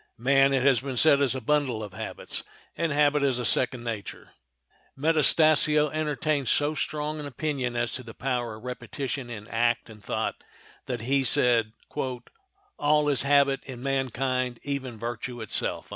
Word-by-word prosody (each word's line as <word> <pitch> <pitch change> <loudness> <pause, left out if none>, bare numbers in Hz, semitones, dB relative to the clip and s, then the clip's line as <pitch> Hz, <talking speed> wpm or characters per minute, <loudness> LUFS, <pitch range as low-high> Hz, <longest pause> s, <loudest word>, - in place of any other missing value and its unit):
Man, 135 +3 +4
it 135 -2 +1
has 135 -3 +4
been 130 -1 -5
said, 140 +1 +6
is 135 -2 +3
a 130 - -4
bundle 130 -4 0
of 100 -3 -8
habits, - - -5 0.3
and 165 -1 -1
habit 145 0 +3
is 135 -3 +2
a 125 - -3
second 125 0 +1
nature. 115 -4 -6 0.7
Metastasio 155 0 +4
entertained 150 -2 -1
so 145 +5 +2
strong 150 0 -3
an 145 - -5
opinion 135 -3 -3
as 120 0 -1
to 130 - -4
the 115 -2 -11
power 120 -3 -2
of 110 - -13
repetition 125 +1 -5
in 105 -2 -8
act 120 0 0
and 105 -1 -15
thought - - -3 0.4
that 120 -3 -3
he 135 +3 +1
said, 120 -5 +3 1.1
"All 150 0 +3
is 140 -4 +2
habit 140 0 +3
in 125 -2 -8
mankind, 130 -2 -1
even 135 -4 -4
virtue 120 +2 -5
itself." 110 -2 -1
135 Hz, 160 wpm, -26 LUFS, 120-145 Hz, 1.1 s, said